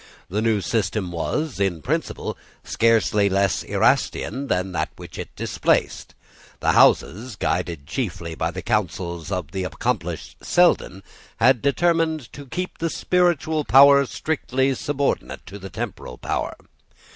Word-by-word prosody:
The 105 +4 -1
new 110 -2 +2
system 100 -1 -1
was, 130 - -2
in 90 -6 0
principle, - - -2 0.3
scarcely 110 -3 +2
less 95 -6 +1
Erastian 135 +6 0
than 95 -4 0
that 80 -3 -1
which - - -10
it - - -5
displaced. - - 0 0.4
The - - +2
Houses, 110 +5 +3
guided 85 -5 -2
chiefly 85 - -4
by - - -1
the - - -6
counsels 85 -1 -2
of 90 -6 -3
the 95 +1 -3
accomplished 90 0 -3
Selden, 170 - +2 0.3
had 125 0 +4
determined 160 -2 +1
to 145 -1 -10
keep 180 +7 -5
the 165 - 0
spiritual 160 -3 +1
power 140 0 +7
strictly 135 -3 -1
subordinate 140 +1 -2
to 100 - -9
the 95 0 -8
temporal 65 -7 -6
power. - - -3
110 Hz, 135 wpm, -23 LUFS, 90-140 Hz, 0.4 s, power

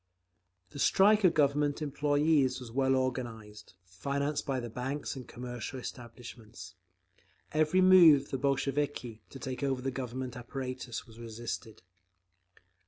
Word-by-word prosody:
The 145 - -9
strike 205 +7 +4
of 180 - +5
Government 145 0 +2
employees 145 -2 +1
was 125 -3 -9
well 135 +1 +2
organised, 115 -6 -4
financed 140 +12 -3
by 135 -2 0
the 120 - -5
banks 130 +7 -4
and 130 -2 -8
commercial 125 +1 -6
establishments. 120 -5 -9 0.8
Every 155 +4 +3
move 175 -7 +8
of - - -17
the 135 - -2
Bolsheviki 140 -4 -1
to - - -10
take 130 0 -5
over 135 -2 0
the 135 - -1
Government 130 -1 -5
apparatus 130 -1 -6
was 115 -1 -15
resisted. 115 -2 -7
130 Hz, 130 wpm, -31 LUFS, 120-145 Hz, 0.8 s, move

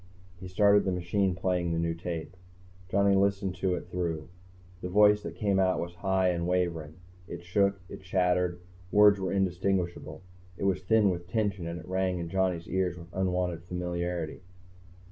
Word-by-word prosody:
He 95 - -8
started 100 +2 +4
the 95 - 0
machine 90 +1 0
playing 90 -2 0
the - - -1
new 85 0 0
tape. 85 0 -6 0.5
Johnny 100 +1 +3
listened 100 -1 +1
to 90 0 0
it 85 - -7
through. 85 -4 -3 0.5
The 90 - -4
voice 105 +2 +5
that 85 - -7
came 100 +1 +1
out 95 -1 +2
was 85 0 -4
high 95 +1 +1
and 85 -1 -1
wavering. 85 -4 -1 0.3
It 85 0 -8
shook, 100 +2 +1
it - - -9
chattered, 90 -1 +1 0.3
words 105 -1 +6
were 95 -1 -2
indistinguishable. 95 -2 -1 0.3
It - - -5
was 95 -2 +1
thin 105 +1 +3
with 85 -1 -5
tension, 100 -4 -1
and 85 +1 -5
it 80 - -12
rang 95 0 0
in 85 -1 -4
Johnny's 90 -2 0
ears 90 -2 -1
with 85 0 -12
unwanted 90 -2 -1
familiarity. 90 -2 -3
90 Hz, 170 wpm, -29 LUFS, 85-95 Hz, 0.5 s, words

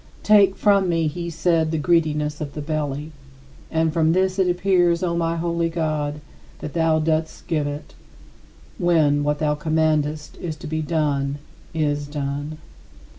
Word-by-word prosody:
"Take 200 -2 +5
from 200 -3 +3
me," 165 -1 +1
he 170 +3 -3
said, 165 -1 +1
"the 160 - -1
greediness 150 -2 +1
of 145 -2 -5
the 150 - -4
belly." 150 0 -3 0.6
And 160 -1 +1
from 160 -1 +3
this 185 +1 +1
it 185 -1 +3
appears, 175 -1 +2
O 170 -1 0
my 165 0 0
holy 170 0 -1
God, 155 -3 -2 0.4
that 150 - -7
thou 160 -1 +2
dost 160 0 -1
give 155 -3 0
it, 145 +1 -6 0.9
when 160 -5 +3
what 150 0 0
thou 150 0 +1
commandest 155 -1 0
to 165 0 -5
be 155 0 -2
done 145 -3 0 0.3
is 145 -2 -1
done. 145 +1 -4
160 Hz, 150 wpm, -22 LUFS, 150-170 Hz, 0.9 s, Take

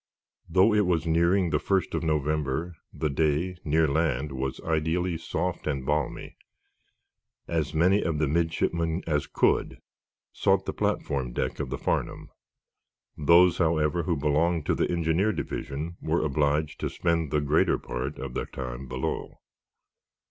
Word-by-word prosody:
Though 95 +6 +4
it 105 -3 +3
was 85 -2 +1
nearing 85 +2 +2
the 75 - +2
first 95 +2 0
of - - -1
November, 75 +1 -1 0.2
the 80 - -2
day, 80 +5 0
near 80 +1 +2
land, 75 -1 0
was 65 0 -3
ideally 80 +2 0
soft 85 +2 -3
and 70 -3 -2
balmy. 75 -1 -2 1.1
As 80 -2 -1
many 95 +6 +4
of 80 -2 -1
the 75 0 +1
midshipmen 85 +2 0
as 75 -3 0
could - - +1 0.6
sought - - +2
the - - -3
platform 65 -3 -1
deck - - -2
of - - -3
the - - -3
"Farnum." - - -2 0.8
Those, 85 +3 +5
however, 80 -1 +2
who 85 -1 -1
belonged 75 +3 +1
to - - +1
the - - 0
engineer 85 +4 +1
division 80 -2 -5
were 80 0 0
obliged 75 +1 0
to - - -2
spend 85 -3 0
the 75 - +1
greater 75 +2 +2
part 65 +4 -5
of 65 -1 -6
their - - -3
time 65 0 -6
below. 65 +1 -4
80 Hz, 150 wpm, -27 LUFS, 75-85 Hz, 1.1 s, Those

